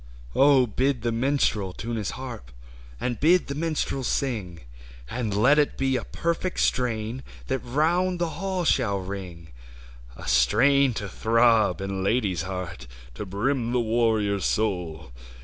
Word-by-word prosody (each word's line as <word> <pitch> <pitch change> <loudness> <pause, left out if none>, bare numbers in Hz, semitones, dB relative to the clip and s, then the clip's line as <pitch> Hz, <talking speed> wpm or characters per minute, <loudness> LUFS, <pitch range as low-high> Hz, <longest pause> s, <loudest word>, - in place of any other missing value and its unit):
BID 130 - +3
the 120 - 0
minstrel 115 -6 0
tune 115 +5 -5
his 105 -4 -3
haxp, 125 - -7 0.5
And 120 -2 -2
bid 175 +4 +4
the 140 - -4
minstrel 155 -3 -2
sing; 105 - -2 0.5
And 115 -2 -2
let 125 +9 +4
it 145 - +1
be 135 -1 +1
a 125 - -1
perfect 170 +2 -2
strain 120 0 0 0.2
That 135 0 -1
round 170 +9 +1
the 170 -1 -1
hall 190 -2 -1
shall 115 -9 +2
ring: 90 -4 -7 0.7
A - - -9
strain 130 - +4
to 100 - -4
throb 115 +1 +3
in 95 -1 -3
lad/s 100 -5 +1
heart, 90 -6 -6 0.3
To 100 - -7
brim 120 +5 -1
the 125 - +2
warrior's 110 -4 +1
soul. 85 - -2
115 Hz, 140 wpm, -25 LUFS, 100-135 Hz, 0.7 s, bid